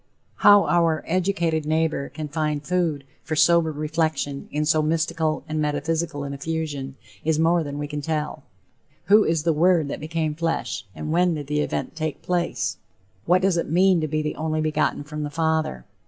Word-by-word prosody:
How 205 -1 +7
our 165 -2 +2
educated 170 -3 0
neighbor 155 -3 0
can 155 -1 -6
find 150 -1 -2
food 170 -6 0 0.2
for 160 - -3
sober 170 0 +4
reflection 155 -2 -2
in 150 +1 -1
so 155 0 +3
mystical 160 0 0
and 155 0 -2
metaphysical 155 0 -1
an 140 0 -5
effusion, 145 -2 -4 0.3
is 160 0 +1
more 165 +2 +3
than 145 -1 -5
we 145 - -3
can 150 0 -5
tell. 150 0 -3 0.7
Who 210 +1 +7
is 160 -2 0
the 165 0 +2
Word 165 -1 +3
that - - -4
became 155 0 -2
flesh? 165 -8 -2
And 155 - -4
when 175 0 +3
did 145 -2 -5
the 150 +1 0
event - - -3
take 155 -2 -4
place? 175 -1 -1 0.5
What 180 +2 +4
does 190 -3 +3
it 170 - -1
mean 180 +1 +4
to 155 - -1
be 155 +1 -1
the 150 - -3
"only 155 0 -1
begotten 155 -1 0
from 150 +1 -6
the 150 - -3
Father?" 160 - -1
155 Hz, 185 wpm, -24 LUFS, 150-165 Hz, 0.7 s, How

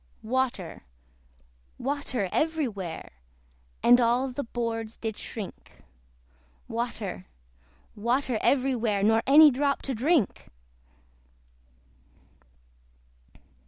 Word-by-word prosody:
Water, 240 -7 -2 1.0
water, 260 -6 -2
every 320 -2 +1
where, 190 -7 -7 0.7
And 245 +1 +7
all 240 +3 +2
the 260 +3 -4
boards 230 -1 -4
did 220 -2 -4
shrink; 210 -2 -9 0.8
Water, 225 -5 -4 0.7
water, 240 +2 0
every 270 -1 +2
where, 215 -4 0
Nor 225 +2 +4
any 295 +2 +8
drop 280 +2 0
to 270 - -3
drink. 270 - +1
240 Hz, 85 wpm, -27 LUFS, 220-270 Hz, 1.0 s, any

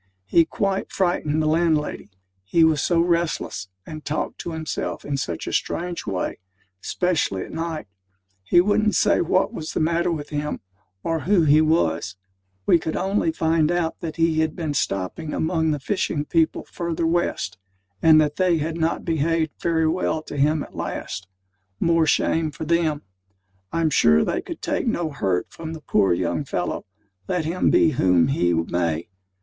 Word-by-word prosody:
He 165 - +4
quite 195 +3 -2
frightened 155 -4 0
the - - +1
landlady, 155 -6 +1 0.3
he 160 - +3
was 160 -3 +4
so 170 -2 +2
restless, 170 - -1 0.2
and 155 -1 -8
talked 150 - -3
to 170 - -5
himself 160 -1 -4
in 145 - -2
such 85 -12 -3
a - - -4
strange 175 0 -2
way; 95 -2 -2 0.4
specially 165 - 0
at - - -10
night. 165 -1 -4 0.6
He 105 - +4
wouldn't 210 +1 +2
say - - +3
what 185 +6 +1
was 160 -7 -5
the - - -1
matter 170 +2 +1
with 150 -3 -4
him, 150 0 -3 0.4
or 165 -1 0
who 180 +2 +3
he 155 0 +5
was: 95 - +1 0.5
we 170 - +5
could 160 0 -3
only 190 -3 +1
find 160 0 +1
out 175 -2 -1
that 160 -3 -5
he 165 -1 +2
had 160 -1 0
been 160 -4 -3
stopping 135 - -2
among 160 -1 +1
the 150 - +1
fishing 150 -2 -1
people 165 -1 +1
further 170 -1 -3
west: 165 - -1 0.4
and 160 -1 +7
that 150 -1 +1
they 180 -3 +3
had 160 +2 -3
not 165 +1 0
behaved 160 -1 +1
very 160 -1 +2
well 160 -1 0
to 150 - -8
him 150 +2 +2
at - - -13
last 95 - -5 0.5
more 165 -1 +3
shame 160 +1 +2
for 155 +2 -7
them! 160 -2 +1 0.7
I'm 165 -2 +1
sure 75 - +4
they - - -1
could - - -8
take - - -1
no 165 -3 0
hurt 95 -10 -1
from 160 -1 -7
the 160 - -8
poor 100 - +2
young 85 -1 0
fellow, - - -3 0.4
let 175 -3 -1
him 175 +3 +1
be 160 - +4
whom 90 - +3
he 90 -10 +2
may. 85 0 -1
160 Hz, 170 wpm, -23 LUFS, 145-170 Hz, 0.7 s, and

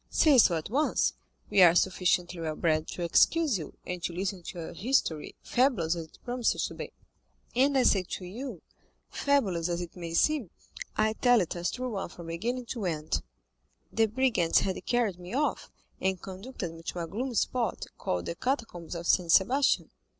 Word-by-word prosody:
Say 290 -5 +5
so 180 -6 +6
at 160 +5 -6
once; 290 +5 +2 0.4
we 195 - +5
are 175 -1 +8
sufficiently 180 -1 +1
well 155 -1 -2
bred 155 -1 +1
to 175 - -5
excuse 280 - +3
you, 155 - -9
and 180 -1 -4
to 175 - -2
listen 185 +1 -3
to 175 - -8
your 165 - -6
history, 170 - 0
fabulous 230 - +2
as 165 -2 -6
it - - -21
promises 245 -1 0
to - - -9
be." - - -7 0.6
"And 270 +2 +3
I 260 - +4
say 200 -5 +4
to 185 0 -6
you, 220 - -7 0.5
fabulous 195 - +1
as 170 0 -1
it 175 -1 -7
may 170 -2 -5
seem, 290 - +2 0.5
I 215 0 +2
tell 245 +1 +4
it 180 -3 -2
as 175 0 -1
a - - -6
true 255 0 -3
one 195 -4 -3
from 170 -1 -11
beginning 235 +10 -3
to 230 -6 -3
end. 155 -2 -1 0.7
The 225 0 +3
brigands 220 -7 +2
had 190 -1 -2
carried 225 -7 +1
me 180 +6 -7
off, 295 +2 -1 0.3
and 190 -1 0
conducted 190 -1 -7
me 165 - -11
to 175 +1 -4
a - - -2
gloomy 240 +8 -4
spot, 240 +2 0
called 90 -1 -2
the - - -3
Catacombs 190 - -3
of 170 0 -5
Saint 170 -1 +3
Sebastian." 255 - +3
190 Hz, 190 wpm, -29 LUFS, 170-245 Hz, 0.7 s, are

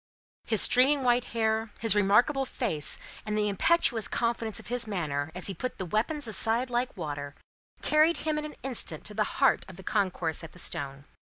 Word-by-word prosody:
His 220 - +2
streaming 270 +3 +5
white 245 0 +3
hair, 220 -1 0
his 225 -1 +4
remarkable 215 +8 +3
face, 155 - -2 0.3
and 210 0 -2
the 210 0 +1
impetuous 225 - +3
confidence 230 -2 -1
of - - -13
his 240 0 0
manner, 155 -7 -2
as 185 - -5
he 195 - -2
put 255 +8 -5
the 185 - -4
weapons 235 - -1
aside 225 +3 +1
like 245 -1 -1
water, 145 -4 -5 0.5
carried 310 +2 +4
him 305 -1 +1
in 300 - -4
an 300 - -7
instant 240 - -3
to 210 - -3
the 215 +1 +1
heart 270 -1 +4
of 190 - -10
the 190 - -11
concourse 180 -6 -1
at 165 - -10
the - - -15
stone. 140 -5 -4
220 Hz, 190 wpm, -28 LUFS, 180-250 Hz, 0.5 s, streaming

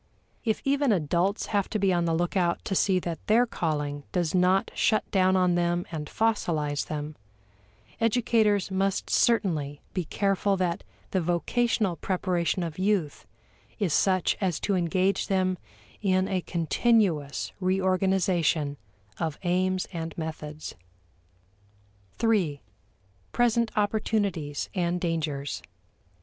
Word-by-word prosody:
If 220 -2 -1
even 280 -1 +2
adults 180 +3 +1
have 200 -2 +1
to - - -1
be 195 -2 +2
on 175 -1 +1
the 165 -1 +1
lookout 175 +1 0
to - - -2
see 190 0 +3
that 170 -2 -4
their 230 +3 +5
calling 150 -8 -2
does 175 -3 0
not 185 +3 +3
shut 215 - +2
down 185 -1 +3
on 180 -1 +3
them 175 0 +1
and 150 -2 -4
fossilize 160 -10 0
them, 150 0 -4 0.8
educators 220 -4 +2
must 195 +1 0
certainly 155 -11 +1
be 180 -3 -2
careful 195 +2 +1
that 180 0 -1 0.3
the 190 - +1
vocational 180 +3 0
preparation 180 0 -1
of 165 0 -5
youth 190 -6 0 0.5
is 195 -8 0
such 185 +1 +2
as 180 -5 0
to 205 - 0
engage 185 +2 +1
them 185 -1 +1 0.4
in 185 -2 +2
a 185 -2 -1
continuous 170 - +1
reorganization 185 -5 +1 0.4
of 160 -3 -2
aims 185 +1 +1
and 165 -1 -5
methods. 155 -2 -6 1.4
3. 200 -11 +1 0.7
Present 235 -1 +2
Opportunities 205 -8 0
and 175 -1 0
Dangers. 155 -5 -2
185 Hz, 120 wpm, -27 LUFS, 165-200 Hz, 1.4 s, their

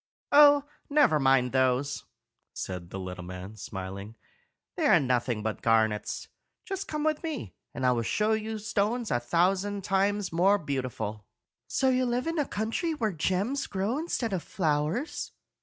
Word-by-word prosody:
"Oh, 290 -1 +8 0.3
never 285 - +4
mind 135 -2 +3
those," 130 +2 +1 0.5
said 90 -2 -5
the 95 - -6
little 90 -1 -6
man, 90 +3 -8
smiling; 100 +1 -7 0.6
"they 325 -5 +1
are 185 - +6
nothing 125 -5 0
but 110 0 -3
garnets. 110 -2 +1 0.4
Just 390 0 -4
come 305 -1 -3
with 310 -1 +1
me, 315 -5 -5 0.2
and 130 - -3
I 125 - +5
will 120 -1 +1
show 210 - +1
you 220 0 -1
stones 220 +2 -1
a 120 - +2
thousand 190 +9 +1
times 195 0 +1
more 190 +5 +4
beautiful." 125 - -4 0.4
"So 260 - +2
you 255 0 +2
live 245 +1 0
in 330 +1 -2
the 295 - +2
country 230 - -2
where 225 -7 0
gems 190 - 0
grow 205 +8 -1
instead 250 -9 -2
of 185 - -1
flowers?" 160 - -1
185 Hz, 155 wpm, -28 LUFS, -, 0.6 s, Oh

